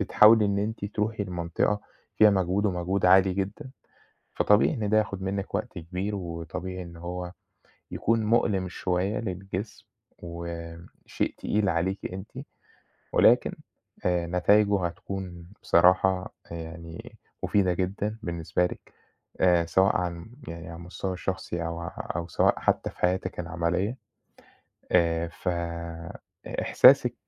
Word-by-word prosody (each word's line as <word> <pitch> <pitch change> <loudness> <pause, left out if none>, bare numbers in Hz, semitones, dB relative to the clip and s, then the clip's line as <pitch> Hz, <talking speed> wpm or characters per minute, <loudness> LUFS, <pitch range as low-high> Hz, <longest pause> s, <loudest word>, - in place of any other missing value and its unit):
بتحاولي 105 +2 +6
إن 100 0 0
أنتِ 105 0 -3
تروحي 105 0 -2
لمنطقة 90 +3 -1 0.4
فيها 105 -1 +7
مجهود 95 +1 +1
ومجهود 90 0 0
عالي 95 +1 +6
جدًا، 100 +8 -4 0.7
فطبيعي 105 +7 +4
إن 110 -7 -2
ده 110 - +4
ياخُد 100 -3 0
منِّك 100 +1 -3
وقت - - -3
كبير 90 +5 -4
وطبيعي 90 +1 -5
إن 85 -1 -11
هو 90 +1 -5 0.6
يكون 115 -1 +1
مؤلِم 105 -4 +2
شوية 95 +3 -1
للجسم 95 0 -5 0.3
وم 85 0 -7 0.2
شيء - - -2
تقيل 105 -1 0
عليكِ 90 +3 -2
أنتِ 95 +3 -8 0.8
ولكن - - +5 0.5
آآ 90 -1 +1
نتايجه 100 +2 +3
هتكون 90 -1 -7 0.2
بصراحة 90 +2 +4 0.2
آآ - - -5
يعني 85 0 -9 0.3
مُفيدة 95 -3 +2
جدًا 100 +4 -2
بالنسبة 85 +1 0
لِك - - -8 0.5
آآ 85 -2 +4
سواء 95 +3 +3
عن 90 +3 -4 0.2
يعني 85 +1 -7
على 85 - -7
المستوى 90 +2 -5
الشخصي 90 -2 -3
أو 85 0 -4
ع 85 - -5 0.3
أو 85 0 -3
سواء 85 - +2
حتّى - - +1
في - - -16
حياتِك 90 0 0
العملية. 90 +6 -1 1.0
آآ 85 -1 +3
ف 85 - -6
إ 85 -1 -5
إحساسِك - - +6
90 Hz, 130 wpm, -27 LUFS, 85-100 Hz, 1.0 s, فيها